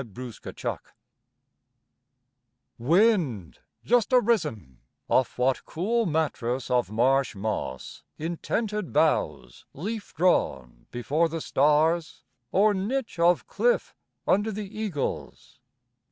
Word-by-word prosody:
DAWN 120 0 -8
WIND - - -4 2.0
Wind, 155 - +2 0.3
just 240 -1 +3
arisen 200 - +1 0.3
(Off 130 - +1
what 130 +1 +1
cool 220 +6 0
mattress 135 -6 -1
of 125 -6 +2
marsh 130 +3 +2
moss 100 -10 -4 0.2
In 165 +2 -4
tented 210 - -2
boughs - - 0
leaf 210 +8 -5
drawn 65 - 0
before 150 +7 0
the 165 +1 -4
stars, 155 +3 +1 0.3
Or 205 +2 +4
niche 230 +2 -3
of 175 +1 +3
cliff 485 0 0 0.3
under 205 +3 +2
the 210 0 -4
eagles?) 200 -13 -5
160 Hz, 100 wpm, -26 LUFS, 125-210 Hz, 2.0 s, Or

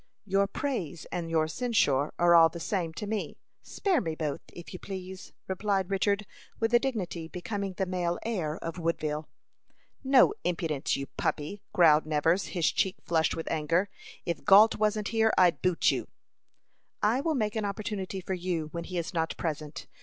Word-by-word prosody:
"Your 195 0 +2
praise 190 - -3
and 170 -2 -3
your 160 -1 +2
censure 160 - +1
are 175 0 +5
all 165 -1 +8
the 170 - -8
same 175 -2 -2
to 210 - -4
me. 215 0 -3 0.2
Spare 370 -8 0
me 160 -5 -3
both, 150 -3 -3
if 175 +2 -10
you 185 - -7
please," 190 -1 -8 0.2
replied 195 0 -1
Richard, 200 +1 +1 0.3
with 225 +1 0
a 240 - +7
dignity 185 -11 -3
becoming 195 +3 -4
the 190 +1 -1
male 175 -2 -1
heir 170 -9 -2
of 165 +2 -5
Woodville. 155 -2 -2 0.7
"No 270 +8 +5
impudence, 165 -5 -1
you 140 - -4
puppy!" 155 +8 -3
growled 155 -5 +5
Nevers, 160 +5 +2
his 175 -4 +1
cheek 190 -1 0
flushed 160 -1 +1
with 165 - -5
anger. 165 +5 +1 0.4
"If 170 - -3
Gault 210 +2 +7
wasn't 215 0 0
here, 220 -1 +3
I'd 180 -2 +4
boot 180 -2 +3
you." - - -3 1.0
"I 225 +6 +3
will 320 +1 0
make 215 -4 -1
an 220 - -1
opportunity 200 -2 -4
for 190 - -4
you 175 -4 -2
when 170 -1 -5
he 180 0 -5
is 170 +2 -3
not 160 -2 -1
present. 155 -2 -4
180 Hz, 175 wpm, -29 LUFS, 165-205 Hz, 1.0 s, all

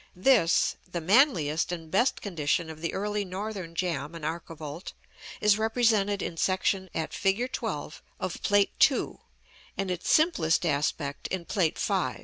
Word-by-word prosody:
This, 185 -3 +3
the 175 - -2
manliest 175 - +3
and 165 -2 -6
best 240 +7 +2
condition 165 -3 -1
of 155 0 -11
the 170 - -2
early 205 +1 -2
northern 190 -2 -6
jamb 165 -3 -2
and 165 -3 -6
archivolt, 160 0 -6 0.5
is 210 0 +3
represented 220 -3 +2
in 165 - -5
section 190 +1 0
at 160 - -3
fig. 210 +6 0
12 - - -4 0.2
of - - -4
Plate 205 -1 +3 0.2
II.; - - -4 0.6
and 195 -1 -1
its 180 -1 -3
simplest 180 - +3
aspect 145 -1 -1
in 185 -2 -4
Plate 170 -5 0
V. - - 0
180 Hz, 145 wpm, -28 LUFS, 160-205 Hz, 0.6 s, This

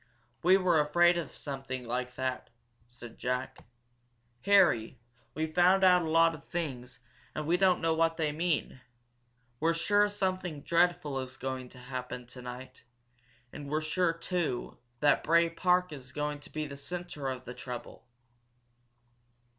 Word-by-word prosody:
"We 185 +3 +6
were 180 -4 +3
afraid 175 +4 +4
of 170 - -7
something 135 -3 -6
like 125 +1 -3
that, 130 0 -3 0.4
said 120 -1 -12
Jack. 125 +1 -2 0.9
"Harry, 170 - +4 0.4
we've 155 0 -2
found 180 +2 +5
out 180 -1 +6
a 160 - -3
lot 165 +1 +5
of 155 -3 -10
things, 135 -8 -5 0.4
and 155 - -3
we 165 +3 +3
don't 185 -1 +3
know 165 0 +2
what 165 0 +1
they 155 -3 0
mean! 155 -4 -1 0.8
We're 165 +2 +2
sure 205 +5 +3
something 185 -6 -2
dreadful 170 -5 +1
is 130 -1 -6
going 130 -1 -4
to 130 - -16
happen 125 -1 -6
tonight. 125 +1 -10 0.7
And 145 -1 -7
we're 155 +1 +1
sure, 165 +2 +1
too, 165 -6 -3 0.2
that 145 -1 +4
Bray 170 +1 +4
Park 180 +1 +2
is 130 -3 -10
going 150 0 -2
to 145 - -14
be 155 0 -3
the 140 -1 -8
centre 175 -2 -6
of 130 -1 -5
the 125 - -7
trouble." 125 0 -8
155 Hz, 150 wpm, -30 LUFS, 130-175 Hz, 0.9 s, We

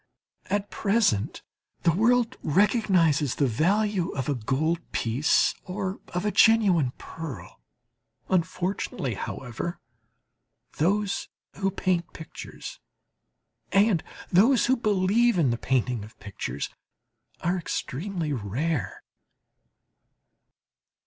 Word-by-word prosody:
At 205 +1 -1
present 200 - +1 0.4
the 170 - +5
world 240 +5 +3
recognizes 170 - +3
the 145 - +2
value 185 - +1
of 135 -2 -2
a 145 - +1
gold 140 +8 0
piece, 120 +6 +2
or 190 +1 -4
of 180 +3 -3
a 210 - +1
genuine 200 - +5
pearl. 150 - -8 0.7
Unfortunately, 180 - -1
however, 120 - -5 1.0
those 200 +5 0 0.3
who 195 0 +1
paint 180 -2 -1
pictures 160 -2 -9 0.9
and 195 -4 +3 0.3
those 230 +8 +5
who 260 - +3
believe 215 0 +2
in 145 -8 +3
the 120 - -1
painting 125 -4 0
of 110 - -14
pictures, 95 -10 -5 0.7
are 180 +2 0
extremely 165 0 -3
rare. 130 - -2
175 Hz, 95 wpm, -26 LUFS, 135-205 Hz, 1.0 s, the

